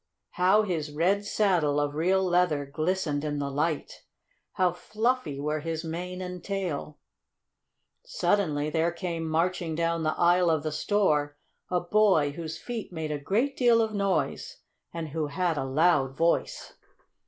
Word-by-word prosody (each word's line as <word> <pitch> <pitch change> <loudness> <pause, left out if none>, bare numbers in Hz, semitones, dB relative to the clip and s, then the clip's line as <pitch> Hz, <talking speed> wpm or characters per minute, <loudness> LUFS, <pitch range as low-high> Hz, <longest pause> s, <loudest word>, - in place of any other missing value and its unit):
How 190 +4 +3
his 160 -7 -2
red 185 +7 +1
saddle, 175 -9 +2
of 145 0 -1
real 185 +5 +2
leather, 175 -5 +2
glistened 155 0 -1
in 150 -1 -2
the 140 -1 -2
light! 150 +2 -2 0.5
How 185 -1 +2
fluffy 215 - -2
were 150 +2 -1
his 160 +1 -4
mane 180 +3 -5
and 180 -1 -7
tail! 180 -7 -3 1.1
Suddenly 185 - 0
there 165 +2 +1
came 170 -2 -4
marching 165 0 0
down 165 0 0
the 155 -1 -1
aisle 175 0 +4
of 160 -3 +1
the 155 - -2
store 150 -5 +1 0.3
a 180 - +1
boy 175 -6 +3
whose 160 +1 -6
feet 230 +2 -6
made 160 -3 -4
a 150 - -2
great 230 - 0
deal 240 -2 +4
of 220 -1 0
noise, 200 - -1 0.3
and 165 -2 -5
who 155 0 -2
had 170 +3 -1
a 140 - -2
loud 135 -1 +2
voice. 165 +1 0
170 Hz, 155 wpm, -27 LUFS, 150-190 Hz, 1.1 s, aisle